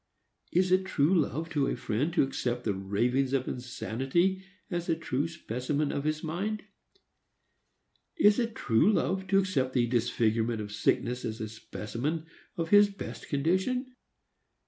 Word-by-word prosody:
Is 180 +1 +2
it 185 +1 +4
true 160 -2 +2
love 165 -2 +1
to 145 -3 +1
a - - 0
friend 130 +10 -1
to - - +5
accept 125 -2 -2
the 105 - 0
ravings 120 +8 0
of 130 -2 +1
insanity 135 +9 -1 0.3
as 175 -1 -2
a 165 - +3
true 150 -2 -1
specimen 145 -1 -2
of 140 - -3
his 155 0 -1
mind? 195 +7 -2 1.5
Is 210 - +5
it 230 -2 -1
true 115 - +3
love 190 -2 0
to 195 0 +3
accept 145 -10 +1
the 125 -2 +3
disfigurement 115 -1 +1
of 105 -1 -5
sickness 120 +3 0
as 110 0 -4
a 110 - -3
specimen 120 +8 -4 0.3
of 165 -1 -2
his 205 0 +7
best 200 - -8
condition? 190 - 0
145 Hz, 150 wpm, -29 LUFS, 120-185 Hz, 1.5 s, his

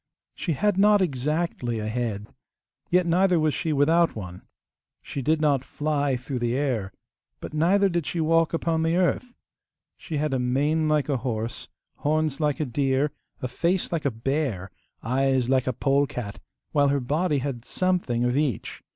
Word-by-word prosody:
She 170 - -2
had 205 +5 +1
not 210 +1 +6
exactly 150 -5 -1
a 105 - -3
head, 110 -2 -2 0.6
yet 180 0 +3
neither 180 +1 +3
was 155 -1 +2
she 160 - -2
without 160 +4 +3
one. 90 -4 -7 0.6
She 140 - -5
did 155 +4 +2
not 145 -4 +2
fly 145 -3 -1
through 125 +1 -4
the 120 0 0
air, 125 -9 -1 0.5
but - - -8
neither 185 +6 +3
did 170 -4 -1
she 170 - -2
walk 165 0 +3
upon 165 -1 0
the 165 +1 +1
earth. 185 +7 0 0.6
She 155 - -4
had 150 -1 0
a 130 - +1
mane 145 +6 +1
like 150 -2 +2
a 140 -3 +1
horse, 115 -2 -4 0.3
horns 155 -1 0
like 150 -3 0
a 155 - 0
deer, 135 +2 +1 0.3
a - - 0
face 170 +9 0
like 165 -4 -2
a - - +4
bear, 115 -5 -2 0.3
eyes 130 +1 +1
like 130 -1 +2
a - - +2
polecat; 135 -5 -1 0.3
while 145 -2 +3
her 140 0 +2
body 150 +5 0
had 130 -3 -3
something 175 -9 0
of 125 +1 +1
each. 140 -7 -1
145 Hz, 170 wpm, -25 LUFS, 125-165 Hz, 0.6 s, not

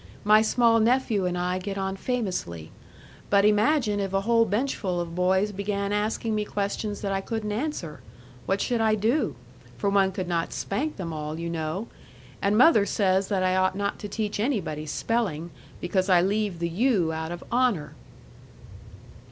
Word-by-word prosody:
"My 215 +1 +6
small 230 +1 +3
nephew 225 -4 +2
and 180 0 -2
I 180 +1 -1
get 195 +1 -5
on 190 0 -2
famously. 185 - -3 0.6
But 200 0 +4
imagine 210 +1 +3
if 195 -1 -2
a 195 - +2
whole 230 +2 +3
benchful 205 -5 -1
of 170 -1 -4
boys 190 +3 +2
began 200 0 -2
asking 215 +2 -1
me 210 0 0
questions 205 0 -3
that 200 - -2
I 195 0 0
couldn't 215 0 -3
answer! 210 - -3 0.5
What 195 +1 +1
should 240 -2 0
I 220 -1 +3
do? 220 - 0 0.4
For 200 - 0
one 195 -1 +3
could 185 -2 -4
not 170 -1 -1
spank 285 +10 -2
them 170 -4 -5
all, 155 0 -4
you 170 0 -3
know! 165 +6 -3 0.5
And 200 +1 +2
mother 235 -6 +6
says 190 -1 +1
that 195 -3 0
I 185 0 +2
ought 185 0 +2
not 200 0 -2
to 205 - -5
teach 210 0 -3
anybody 185 - -1
spelling, 175 -2 -2 0.3
because 185 +2 0
I 180 -2 +6
leave 200 0 0
the 170 0 -2
U 185 -4 +1
out 160 +1 -4
of 175 - -6
HONOR." 240 -10 +1
200 Hz, 175 wpm, -26 LUFS, 180-220 Hz, 0.6 s, My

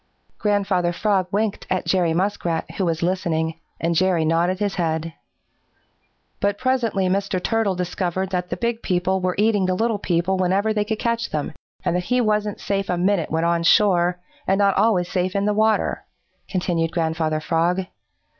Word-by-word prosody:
Grandfather 195 -4 +1
Frog 190 0 +1
winked 210 0 -1
at 185 0 -1
Jerry 180 -3 +2
Muskrat, 175 -2 -1
who 190 - +2
was 165 -1 -1
listening, 165 -3 -1 0.2
and 170 +1 0
Jerry 175 -1 +2
nodded 170 +3 +1
his 205 0 -1
head. 165 -2 -2 1.3
"But 200 0 0
presently 235 -6 0
Mr. 195 0 0
Turtle 220 0 0
discovered 180 +1 -2
that 180 -1 -2
the - - -3
big 235 -1 -1
people 185 0 0
were 180 0 0
eating 205 -2 +2
the 185 - +1
little 225 +1 0
people 180 +1 0
whenever 190 +4 +1
they 210 -1 0
could 220 0 -2
catch 230 +1 -1
them, 150 -2 -3 0.3
and 175 - +1
that 180 0 -1
he 250 +4 +1
wasn't 210 -3 0
safe 195 -1 -2
a 180 - 0
minute 185 -1 +1
when 160 +1 0
on 170 0 +2
shore, 180 0 +3 0.3
and 190 - +3
not 200 -1 +3
always 195 -4 +2
safe 185 +1 -1
in 200 0 +1
the 210 - +2
water," 215 +1 +1 0.5
continued 175 -3 0
Grandfather 160 -2 0
Frog. 170 +4 +1
185 Hz, 175 wpm, -22 LUFS, 175-205 Hz, 1.3 s, shore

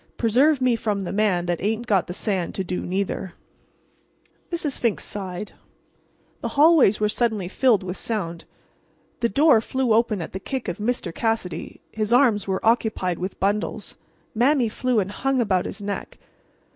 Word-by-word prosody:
Preserve 260 +5 +3
me 250 -2 +3
from 210 -3 -2
the 190 - -4
man 200 -4 +1
that 175 -1 -2
ain't 220 +4 -1
got 200 -6 +2
the 180 - -5
sand 190 -6 -2
to 190 - -1
do 180 0 -3
neither!" 190 0 -3 1.2
Mrs. 315 -5 -1
Fink 230 -4 +1
sighed. 195 -1 -5 0.9
The - - -2
hallways 295 - +6
were 210 - +2
suddenly 215 -4 0
filled 220 0 +2
with 185 0 -5
sound. 170 -7 -4 0.7
The 235 - +1
door 280 0 +5
flew 260 0 0
open 220 -2 +2
at 165 - -6
the 190 - -4
kick 260 +5 -4
of - - -4
Mr. 210 -6 -2
Cassidy. 225 -5 -3
His 215 0 -2
arms 240 -5 +4
were 190 +2 -2
occupied 220 -6 +1
with 185 +1 -5
bundles. 205 +2 -2 0.4
Mame 250 +1 +3
flew 250 +1 0
and 195 -1 -2
hung 270 +4 0
about 190 -6 +1
his 205 - -7
neck. 200 0 -5
215 Hz, 165 wpm, -23 LUFS, 190-240 Hz, 1.2 s, hallways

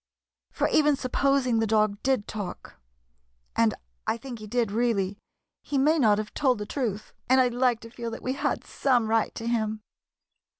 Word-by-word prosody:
"For - - 0
even 300 -1 +4
supposing 265 -2 +1
the 225 - +1
dog 215 -1 +2
did 260 -6 +1
talk 200 - -7 0.3
— - - -44
and - - +3 0.3
I 225 - +1
think 240 -1 -8
he 215 - -8
did, 230 -1 0
really 205 -4 0 0.2
— - - -58
he 285 - -2
may 305 +4 +3
not 215 -6 +4
have 215 0 -4
told 260 -4 +2
the 210 - -4
truth, 215 -5 -3 0.2
and 260 +1 +6
I 255 -1 +4
'd - - -8
like 245 -2 +2
to 230 - -11
feel 235 -1 -5
that 225 - -8
we 255 - -1
had 275 - -1
some 245 -5 +1
right 225 -1 +1
to 230 - -6
him." 220 -2 -1
230 Hz, 200 wpm, -27 LUFS, 215-255 Hz, 0.3 s, and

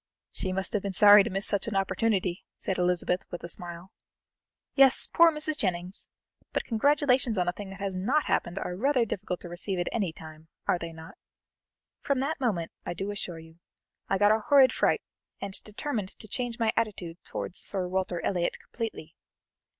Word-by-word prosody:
"She 185 - -3
must 190 +1 -2
have 210 - +1
been 200 0 -4
sorry 205 +2 +9
to - - -3
miss 195 +1 -1
such 200 - 0
an 220 - -3
opportunity," 195 -2 0
said 190 - -2
Elizabeth, 180 0 +1
with 175 - -7
a - - -4
smile. 175 +1 -7 0.8
"Yes, 270 -1 +6
poor 335 0 +5
Mrs. 305 0 0
Jennings! 180 -3 -3 0.5
But - - 0
congratulations 260 -1 +2
on 180 -1 +1
a - - +3
thing 200 +1 -8
that 195 0 -10
has 195 -1 -3
not 250 +12 +1
happened 175 - 0
are 180 - -3
rather 255 +3 +2
difficult 185 -4 -4
to - - -8
receive 185 +2 -2
at 175 - -1
any 200 -7 -1
time, 160 0 -12 0.2
are 175 - +2
they 170 -1 -5
not? 160 0 -12 0.8
From 280 - 0
that 280 +5 -1
moment, 190 -10 0
I - - -4
do 195 +3 -3
assure 180 -4 -4
you, 160 +1 -14 0.5
I 195 - +2
got 205 +2 +5
a 220 - +3
horrid 265 +3 +5
fright, - - +2 0.4
and 200 -1 -5
determined 210 -2 -4
to 215 - -10
change 240 +1 -3
my 225 -2 +1
attitude 180 -6 -3
towards - - -5
Sir 190 -3 -1
Walter 180 -2 -2
Elliot 175 -3 0
completely. 220 -9 -6
195 Hz, 190 wpm, -28 LUFS, 175-230 Hz, 0.8 s, sorry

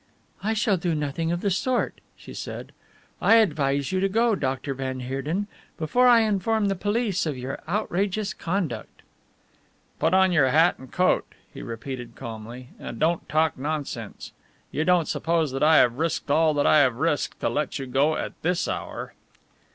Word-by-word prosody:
"I 220 +2 0
shall 215 -3 +2
do 170 -1 -1
nothing 150 +3 -2
of 175 0 -2
the 200 - 0
sort," 250 +7 -1 0.2
she - - -11
said, - - -7 0.5
"I 225 - +6
advise 145 -9 +2
you 190 - +1
to 195 +1 +1
go, 230 +3 +2
Dr. 135 -5 -2
van 130 -1 -4
Heerden, 135 +10 -2 0.3
before 245 +11 +3
I 240 -2 +7
inform 215 0 +1
the 195 - 0
police 205 -1 0
of 145 -4 -3
your 130 +2 -5
outrageous 200 +2 -1
conduct." 165 - -4 1.0
"Put 160 +4 +2
on 190 0 +5
your 155 -7 +4
hat 160 +6 +4
and 130 -1 -13
coat," 185 0 +1 0.2
he - - -8
repeated 120 +1 -7
calmly, 115 +3 -8
"and - - -7
don't 165 +2 0
talk 155 -2 +1
nonsense. 140 -6 -5 0.4
You 155 - -1
don't 175 -2 +3
suppose 165 -3 0
that 135 - -4
I 155 +1 +6
have 120 +2 +4
risked 165 -3 -1
all 155 0 +3
that 145 - +1
I 155 - +6
have 130 -4 +3
risked 150 +3 -1
to - - +1
let 150 - -2
you 135 - -5
go 140 +5 +2
at - - -4
this 180 +2 0
hour." - - -5
160 Hz, 175 wpm, -25 LUFS, 135-190 Hz, 1.0 s, I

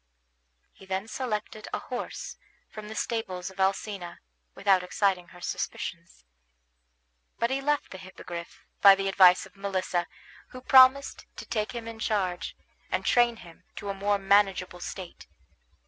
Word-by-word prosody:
He 195 - -17
then 190 +2 -2
selected 215 -3 -4
a - - -1
horse 250 - -6 0.4
from 215 -1 -8
the 220 - -8
stables 190 -7 -3
of 190 - -17
Alcina, 190 -1 -1 0.4
without 190 -2 +3
exciting 180 0 0
her 175 +1 -15
suspicions; 170 - -5 1.1
but 235 +2 0
he 270 +1 0
left 295 +1 0
the 190 - -8
Hippogriff, 175 -2 -9 0.2
by 200 -1 +9
the 195 0 -2
advice 185 -2 +6
of 195 - -18
Melissa, 185 -3 -2 0.4
who 255 - -11
promised 260 +1 +5
to - - -8
take 215 +2 -2
him 235 -1 -6
in 225 -1 -8
charge, 185 -6 -1 0.3
and 185 +1 -1
train 240 -1 +4
him 170 +1 -16
to 200 - -6
a - - -1
more 200 +1 +1
manageable 195 -2 +2
state. 180 0 -8
195 Hz, 145 wpm, -28 LUFS, 185-220 Hz, 1.1 s, by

